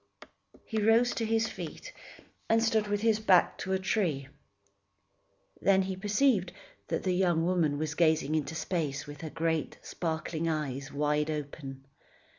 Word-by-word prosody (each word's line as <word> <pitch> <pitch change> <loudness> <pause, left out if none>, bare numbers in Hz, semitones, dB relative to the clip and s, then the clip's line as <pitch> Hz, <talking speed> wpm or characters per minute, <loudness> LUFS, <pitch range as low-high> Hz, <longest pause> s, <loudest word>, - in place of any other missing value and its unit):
He 220 -2 -2
rose 230 +3 +4
to 230 - -2
his 225 0 +2
feet - - -8 0.6
and 225 0 +4
stood 220 -2 +2
with 205 0 -1
his 220 -1 +3
back 190 -5 +4
to 190 - -2
a - - +3
tree. 175 -8 -1 1.3
Then 195 -1 +4
he 190 0 -3
perceived 205 -1 +1 0.3
that - - -2
the 185 - +1
young 175 -3 +2
woman 170 -5 +1
was 155 0 -2
gazing 155 -2 +2
into 155 +1 -1
space 160 -6 -2
with 145 0 -10
her 160 - -5
great, 160 0 -1
sparkling 160 0 -3
eyes 140 -3 -3
wide 150 +1 0
open. 140 -3 -6
170 Hz, 150 wpm, -30 LUFS, 150-205 Hz, 1.3 s, rose